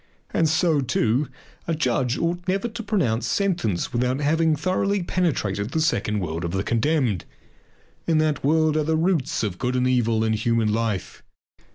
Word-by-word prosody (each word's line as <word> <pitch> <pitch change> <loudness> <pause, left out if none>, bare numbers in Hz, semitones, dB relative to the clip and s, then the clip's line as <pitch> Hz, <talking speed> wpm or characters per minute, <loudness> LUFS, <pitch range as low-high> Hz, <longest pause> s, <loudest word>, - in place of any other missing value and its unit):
And 165 -1 +2
so, 160 -1 +2
too, 125 +2 +1 0.4
a 165 - 0
judge 130 -3 0
ought 175 +2 -2
never 195 +5 0
to 230 0 -6
pronounce 125 - 0
sentence 160 - 0
without 125 +2 +1
first 145 - -2
having 160 +1 +3
thoroughly 185 +5 0
penetrated 115 - -1
the 160 - +1
second 110 -10 0
world 85 -1 -3
of 85 - -2
the 95 0 0
condemned. 120 - +1 0.8
In 165 -2 +3
that 155 -2 +1
world 155 +1 +3
are 155 - +2
the 160 +1 +1
roots 165 -8 0
of 95 -4 -3
good 125 +1 -1
and 125 0 +1
evil 115 -3 +2
in 110 0 +1
human 110 0 +1
life. 110 -4 -2
140 Hz, 175 wpm, -23 LUFS, 115-165 Hz, 0.8 s, having